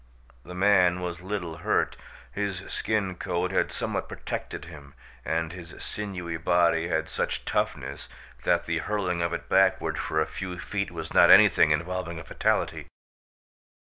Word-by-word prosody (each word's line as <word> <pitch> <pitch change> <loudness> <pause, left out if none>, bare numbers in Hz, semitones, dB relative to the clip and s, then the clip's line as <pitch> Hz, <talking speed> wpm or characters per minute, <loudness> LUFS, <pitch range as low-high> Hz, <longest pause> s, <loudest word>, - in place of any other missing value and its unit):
The 90 - -9
man 90 -2 +4
was 90 -1 -4
little 90 -4 -4
hurt. 85 - +1 0.4
His 100 -2 -3
skin 105 -4 -1
coat 90 +2 -1
had 95 - +1
somewhat - - -3
protected 75 - -5
him 75 -4 -12 0.3
and 80 +2 -1
his 85 -3 -10
sinewy 90 -5 -5
body 85 0 +2
had 80 -2 0
such - - -2
toughness - - -2 0.3
that - - +2
the - - -1
hurling 90 -5 -1
of 85 0 0
it 85 - -4
backward 95 +1 +3
for 80 - -1
a 80 - +2
few 90 -2 -6
feet 100 +1 -3
was 80 -2 -7
not - - +7
anything - - +7
involving 85 +2 -1
a 80 - -7
fatality. - - -1
90 Hz, 150 wpm, -27 LUFS, 80-95 Hz, 0.4 s, not